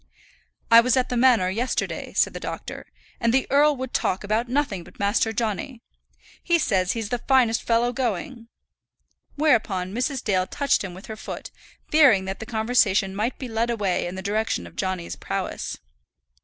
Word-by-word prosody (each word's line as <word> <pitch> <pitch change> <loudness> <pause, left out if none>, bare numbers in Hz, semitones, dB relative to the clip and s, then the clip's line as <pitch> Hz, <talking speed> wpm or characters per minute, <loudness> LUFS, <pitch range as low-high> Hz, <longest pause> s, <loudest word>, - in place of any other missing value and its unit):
"I 230 0 +10
was 250 +1 +2
at 255 - +1
the 250 - -2
manor, 235 -7 +4
yesterday," 240 +6 -2
said - - +2
the - - -6
doctor, - - -7 0.3
"and 230 - +2
the 265 +2 +2
earl 290 +1 +5
would 260 -1 -6
talk 185 - 0
about 220 +4 -1
nothing 250 -9 -1
but - - -17
Master 205 +2 +1
Johnny. 230 +3 -3 0.6
He 340 -1 +2
says 190 - +1
he's 225 -3 -4
the 245 - -1
finest 245 -3 +3
fellow 235 +1 +1
going." 235 0 -3 0.9
Whereupon 205 -11 +1
Mrs. 255 +3 -2
Dale 185 -4 +1
touched 280 -6 +1
him 180 -3 -6
with 190 - -11
her 220 - -7
foot, 215 - -8 0.4
fearing 265 -11 +5
that 190 +1 -5
the 220 - -7
conversation 220 -4 +2
might 220 +5 -1
be 260 - -6
led 230 +1 -1
away 200 -7 0
in 175 - -6
the 190 - -6
direction 215 +2 -1
of - - -13
Johnny's 185 -3 -3
prowess. - - -4
225 Hz, 175 wpm, -24 LUFS, 195-250 Hz, 0.9 s, I